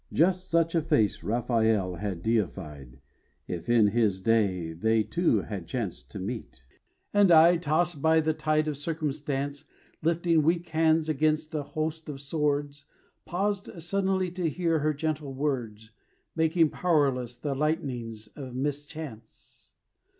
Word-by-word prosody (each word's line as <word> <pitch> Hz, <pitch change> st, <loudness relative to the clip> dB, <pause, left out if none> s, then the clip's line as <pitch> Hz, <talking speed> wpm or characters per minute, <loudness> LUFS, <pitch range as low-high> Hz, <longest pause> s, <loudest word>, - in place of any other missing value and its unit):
Just 185 Hz, +3 st, +2 dB
such 165 Hz, -1 st, +2 dB
a 165 Hz, -, +2 dB
face 110 Hz, -8 st, +1 dB
Raphael 110 Hz, -2 st, +1 dB
had 95 Hz, -4 st, -4 dB
deified, 75 Hz, -, -2 dB, 0.5 s
If 85 Hz, +1 st, -5 dB
in 115 Hz, -3 st, +5 dB
his 105 Hz, -3 st, +1 dB
day 95 Hz, -6 st, +1 dB
they 110 Hz, +6 st, +2 dB
two 165 Hz, -, +1 dB
had 95 Hz, -6 st, -6 dB
chanced 110 Hz, -3 st, -4 dB
to -, -, -8 dB
meet. 95 Hz, -, -6 dB, 0.5 s
And 205 Hz, -3 st, +5 dB
I, 170 Hz, +2 st, +7 dB
tossed 165 Hz, -1 st, 0 dB
by 160 Hz, +1 st, +4 dB
the 155 Hz, 0 st, +1 dB
tide 155 Hz, 0 st, 0 dB
of 150 Hz, -2 st, -2 dB
circumstance, 145 Hz, -2 st, -3 dB, 0.4 s
Lifting 165 Hz, 0 st, +2 dB
weak 165 Hz, +2 st, +1 dB
hands 160 Hz, 0 st, +2 dB
against 155 Hz, +1 st, 0 dB
a 155 Hz, -, -1 dB
host 155 Hz, +2 st, -4 dB
of 140 Hz, -2 st, -6 dB
swords, 145 Hz, 0 st, -2 dB, 0.4 s
Paused 200 Hz, +2 st, -1 dB
suddenly 190 Hz, 0 st, 0 dB
to 180 Hz, -2 st, -1 dB
hear 165 Hz, 0 st, 0 dB
her 150 Hz, +1 st, 0 dB
gentle 150 Hz, -2 st, -3 dB
words 120 Hz, -6 st, -3 dB, 0.4 s
Making 160 Hz, -1 st, +3 dB
powerless 135 Hz, -8 st, +1 dB
the 140 Hz, +3 st, -3 dB
lightnings 125 Hz, -7 st, -2 dB
of 130 Hz, -4 st, -8 dB
mischance. 145 Hz, -4 st, -7 dB
145 Hz, 135 wpm, -28 LUFS, 115-160 Hz, 0.5 s, I